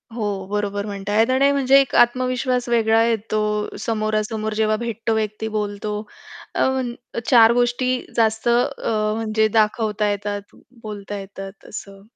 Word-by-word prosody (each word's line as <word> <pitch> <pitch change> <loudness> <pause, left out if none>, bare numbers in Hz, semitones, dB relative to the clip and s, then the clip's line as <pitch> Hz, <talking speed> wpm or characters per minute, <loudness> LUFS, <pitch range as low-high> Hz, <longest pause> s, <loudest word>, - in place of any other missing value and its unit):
हो, 205 -4 -3
बरोबर 205 0 -2
म्हणताहेत. 205 +3 0
आणि 275 +2 +4
म्हणजे 275 0 +5
एक 270 - 0
आत्मविश्वास 250 0 +1
वेगळा 225 -1 +3
येतो. 220 -1 -1 0.5
समोरासमोर 215 0 -1
जेव्हा 215 0 +1
भेटतो 225 -1 -2
व्यक्ती 215 0 -2
बोलतो 210 0 -3 0.6
अ, - - +1
मन 260 -2 -2 0.4
चार 230 -3 +7
गोष्टी 245 +1 +1 0.2
जास्त 220 0 +1
अ, 230 -4 +1
म्हणजे 220 -1 +1
दाखवता 210 -1 +1
येतात, 205 0 -4 0.3
बोलता 205 -1 -6
येतात 195 0 -10
असं. 195 -2 -9
220 Hz, 130 wpm, -21 LUFS, 210-240 Hz, 0.6 s, चार